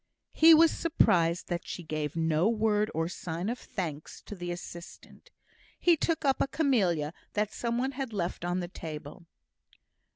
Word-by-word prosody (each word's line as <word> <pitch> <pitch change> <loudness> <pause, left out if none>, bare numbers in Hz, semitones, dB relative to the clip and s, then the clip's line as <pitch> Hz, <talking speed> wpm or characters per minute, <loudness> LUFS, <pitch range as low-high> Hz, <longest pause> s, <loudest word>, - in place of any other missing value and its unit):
He 325 0 +8
was 325 +1 +6
surprised 175 - +2
that 175 -1 -3
she 175 - -6
gave 155 -1 -3
no 160 +3 +2
word 215 -2 +1
or 165 +1 0
sign 175 +1 -4
of 245 - -3
thanks 155 -6 -6
to - - -9
the 175 -3 -5
assistant. 175 - -10 0.5
He 345 -1 +5
took 320 0 -1
up 270 -1 +2
a - - +2
camellia 190 - +1 0.2
that 210 0 -1
some 235 -1 -2
one 260 +2 0
had 265 -2 -5
left 180 -5 -3
on 175 +1 -1
the 175 - -4
table. 160 -1 -8
180 Hz, 165 wpm, -29 LUFS, 165-245 Hz, 0.5 s, He